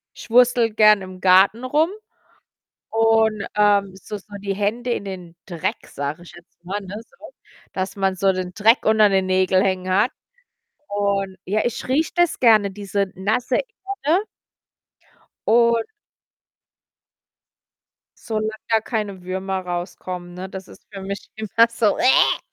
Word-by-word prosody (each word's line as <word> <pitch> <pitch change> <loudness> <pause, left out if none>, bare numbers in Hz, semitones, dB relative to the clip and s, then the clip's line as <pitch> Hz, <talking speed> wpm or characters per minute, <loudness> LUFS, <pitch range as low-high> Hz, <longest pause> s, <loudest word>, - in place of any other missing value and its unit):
ich - - -11
wurstele 240 -1 +4
gern 215 -1 +5
im 185 -1 -10
Garten 190 +6 +5
rum 300 +6 +2 1.0
und, 225 -2 +2
ähm 200 -2 +2
so 210 +2 -7
so 205 +1 -16
die 200 -1 -3
Hände 225 +5 -2
in 200 - -3
den 180 -3 -8
Dreck, 170 -4 -4
sage 145 +4 -5
ich 175 - -13
jetzt 175 0 -19
mal, 200 +4 -3
ne? 195 0 -9
So, - - -27 0.6
dass 185 0 -3
man 190 -1 0
so 195 +1 +2
den 185 -1 -4
Dreck 225 +4 +3
unter 215 -1 +5
den 190 -1 +1
Nägeln 185 0 +2
hängen 185 -1 -1
hat 210 +7 +3 0.8
und 200 -2 -1
ja, 210 +4 0
ich 240 - -3
rieche 295 +5 +1
das 350 -1 +2
gerne, 215 -5 +4
diese 200 0 -2
nasse 215 +6 -1 0.5
Erde. 350 +7 +3 1.2
Und 235 0 +3 2.4
solange 215 -1 -1 0.2
da 225 -1 +4
keine 210 -5 -4
Würmer 190 +1 -3
rauskommen, 175 0 -6
ne? 185 +1 -7
Das 190 0 -8
ist - - -15
für 195 - -7
mich 200 +1 -6
immer 220 +2 +3
so: 225 -3 +1
Wäh. 255 - +4
200 Hz, 145 wpm, -21 LUFS, 185-225 Hz, 2.4 s, gern